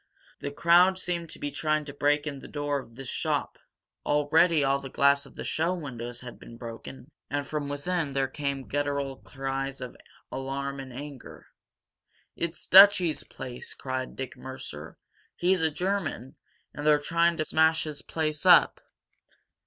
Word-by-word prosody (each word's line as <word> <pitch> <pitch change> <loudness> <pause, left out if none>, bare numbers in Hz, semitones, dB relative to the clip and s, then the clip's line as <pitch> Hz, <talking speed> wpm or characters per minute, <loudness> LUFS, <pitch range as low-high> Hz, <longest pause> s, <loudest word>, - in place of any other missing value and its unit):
The 140 - -4
crowd 175 +5 +5
seemed 175 -3 -3
to - - -9
be 145 - -4
trying 155 0 0
to 140 - -8
break 145 +1 +2
in 140 -2 -4
the - - -11
door 145 -1 -2
of 115 -3 -13
this 135 0 -8
shop. - - -2 0.4
Already 150 +2 +3
all 135 0 +2
the 135 -1 -8
glass 140 +1 +3
of - - -18
the - - -6
show 165 +3 0
windows 120 -6 -6
had 125 -1 -10
been 115 - -12
broken, 120 +3 -9 0.2
and 145 0 -2
from 145 -1 -3
within 145 +1 -2
there 135 0 +1
came 140 -1 -4
guttural 140 -1 -1
cries 135 0 -4
of 125 -1 -7 0.4
alarm 135 +1 -4
and 135 -1 -8
anger. 140 0 -9 0.9
"It's 170 0 -4
Dutchy's 190 -4 +7
place!" 125 -2 -8
cried 130 -1 -4
Dick 130 -1 -6
Mercer. 80 - -8 0.4
"He's 180 0 +2
a 160 - +3
German, 175 -6 -3 0.4
and 145 - -6
they're 150 -1 +6
trying 170 +3 +2
to 155 - -1
smash 160 +1 +3
his 150 -2 -6
place 155 -2 -3
up!" - - +6
145 Hz, 160 wpm, -28 LUFS, 135-160 Hz, 0.9 s, Dutchy's